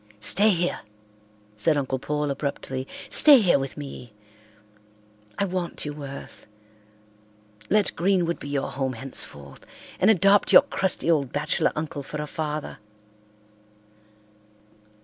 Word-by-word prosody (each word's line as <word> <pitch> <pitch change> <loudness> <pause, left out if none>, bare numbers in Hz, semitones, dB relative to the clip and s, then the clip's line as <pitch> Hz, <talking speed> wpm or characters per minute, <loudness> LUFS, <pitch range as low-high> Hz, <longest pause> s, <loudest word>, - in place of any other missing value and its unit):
"Stay 200 - +3
here!" 175 -3 0 0.8
said 150 +8 +1
Uncle 130 -2 -2
Paul 150 +1 -2
abruptly. 135 -2 -4 0.2
"Stay 290 -4 +7
here 180 -9 +3
with 135 0 -5
me. 125 -6 -9 1.2
I 200 - +1
want 180 -4 -3
you, 145 - -4
Worth. 140 -2 -10 1.2
Let 210 -1 +2
Greenwood 175 -2 +1
be 145 - -8
your 140 -1 -2
home 135 0 -2
henceforth 115 - -8 0.4
and 190 - +4
adopt 200 0 +4
your - - +9
crusty 190 - 0
old 140 -6 +1
bachelor 150 +1 0
uncle 155 -1 -4
for 150 +2 -7
a 150 - -3
father." 150 -3 -5
150 Hz, 120 wpm, -25 LUFS, 135-180 Hz, 1.2 s, your